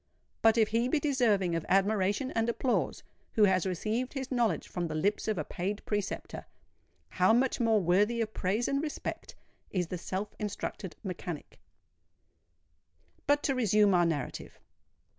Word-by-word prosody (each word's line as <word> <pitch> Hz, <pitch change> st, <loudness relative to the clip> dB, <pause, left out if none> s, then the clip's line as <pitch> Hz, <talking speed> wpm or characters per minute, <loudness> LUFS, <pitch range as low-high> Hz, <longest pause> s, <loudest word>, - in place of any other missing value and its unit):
But 225 Hz, +1 st, +5 dB
if 220 Hz, -2 st, +4 dB
he 230 Hz, +2 st, +1 dB
be 295 Hz, +4 st, +1 dB
deserving 235 Hz, -, +2 dB
of 165 Hz, -1 st, -1 dB
admiration 200 Hz, +5 st, +2 dB
and 225 Hz, +1 st, 0 dB
applause, 245 Hz, +2 st, 0 dB, 0.3 s
who 215 Hz, -, +4 dB
has 190 Hz, -2 st, +3 dB
received 220 Hz, +7 st, -2 dB
his 270 Hz, -2 st, -5 dB
knowledge 240 Hz, -3 st, +1 dB
from 175 Hz, -2 st, -3 dB
the 155 Hz, -, -4 dB
lips 200 Hz, +9 st, 0 dB
of 215 Hz, -3 st, 0 dB
a 155 Hz, -, -1 dB
paid 195 Hz, +7 st, -4 dB
preceptor—how 90 Hz, -, -3 dB
much 255 Hz, +3 st, +2 dB
more 225 Hz, -2 st, +3 dB
worthy 205 Hz, +6 st, +2 dB
of 220 Hz, -1 st, -2 dB
praise 205 Hz, +6 st, 0 dB
and 275 Hz, 0 st, 0 dB
respect 300 Hz, -1 st, -5 dB, 0.3 s
is 180 Hz, -3 st, -1 dB
the 180 Hz, -, -4 dB
self 195 Hz, +4 st, -4 dB
instructed 200 Hz, -4 st, -4 dB
mechanic! 180 Hz, -4 st, -6 dB, 1.7 s
But 290 Hz, +1 st, +3 dB
to 275 Hz, -, +1 dB
resume 210 Hz, -5 st, +3 dB
our 175 Hz, -1 st, +4 dB
narrative. 145 Hz, -5 st, -4 dB
210 Hz, 150 wpm, -30 LUFS, 185-235 Hz, 1.7 s, But